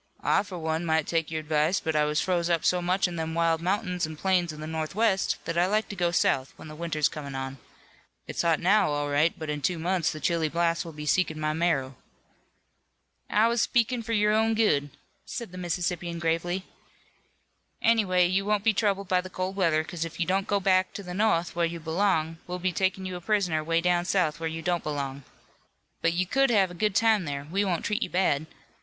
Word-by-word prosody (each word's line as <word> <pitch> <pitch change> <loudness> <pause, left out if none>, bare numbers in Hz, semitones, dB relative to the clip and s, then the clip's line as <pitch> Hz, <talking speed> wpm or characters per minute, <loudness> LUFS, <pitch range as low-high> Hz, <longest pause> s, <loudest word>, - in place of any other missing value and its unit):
"I - - +3
for 190 -3 -8
one 160 0 -2
might 160 -2 +1
take 165 -2 -1
your 160 -1 -3
advice, 155 +4 +1
but 160 -2 -2
I 150 0 +3
was 150 0 0
froze 175 -2 0
up 170 -2 +1
so 180 -1 +3
much 185 +2 +1
in 175 -1 -6
them 160 0 -3
wild 165 -1 +2
mountains 180 -2 -1
an' 155 - -7
plains 180 -1 +1
of 155 - -10
the 155 - -6
northwest 190 +6 0
that 165 +1 -1
I 175 - +3
like 215 +3 0
to 205 - -5
go 175 -2 +1
south 135 -5 +1
when - - -11
the 155 - -9
winter's 155 -2 0
comin' 140 -3 -7
on. 135 0 -5 0.7
It's - - -3
hot 165 -2 +2
now, 200 +2 +3
all 145 0 -1
right, 150 +4 +2
but 155 - -6
in 150 -1 -3
two 175 +5 0
months 170 0 0
the 155 - -7
chilly 160 +1 0
blasts 170 0 0
will 165 - -8
be 150 -1 -8
seekin' 155 -1 +1
my 155 0 0
marrow." 145 -6 0 1.3
"I 215 +2 +4
was 235 0 +1
speakin' 240 +1 +1
for 230 0 -4
your 210 -1 +3
own 220 +1 +2
good," 145 -11 +2 0.3
said 235 -6 -6
the 185 - -8
Mississippian 175 -1 -2
gravely. 170 +3 -1 1.2
"Anyway, 195 -6 +3
you 185 +2 +1
won't 205 0 0
be 225 0 +4
troubled 200 -1 0
by 185 0 +2
the 185 - -9
cold 185 +1 -3
weather 165 -5 +2
'cause 170 0 -4
if 165 +1 -7
you 170 - +1
don't 190 +2 0
go 200 - +1
back 185 -1 +3
into 200 - -9
the 180 -1 -7
no'th 180 -5 +1
where 170 -1 +2
you 170 0 -6
belong, 165 -1 0
we'll 180 0 -3
be 180 +1 -1
takin' 190 +1 -1
you 185 -1 -4
a - - -10
prisoner 180 -5 0
way 165 +1 +1
down 175 0 +1
south, 175 -5 +1
where 165 0 -2
you 165 0 -6
don't 175 0 0
belong. 140 -2 -4 0.8
But 165 - +2
you 180 +2 0
could 270 +8 +2
have 195 -6 +3
a - - -8
good 205 +3 -1
time 220 -4 +3
there. 140 -2 -4
We 200 +3 +1
won't 180 -4 -1
treat 210 +3 -1
you - - -1
bad. 160 -5 +1
175 Hz, 225 wpm, -27 LUFS, 160-190 Hz, 1.3 s, I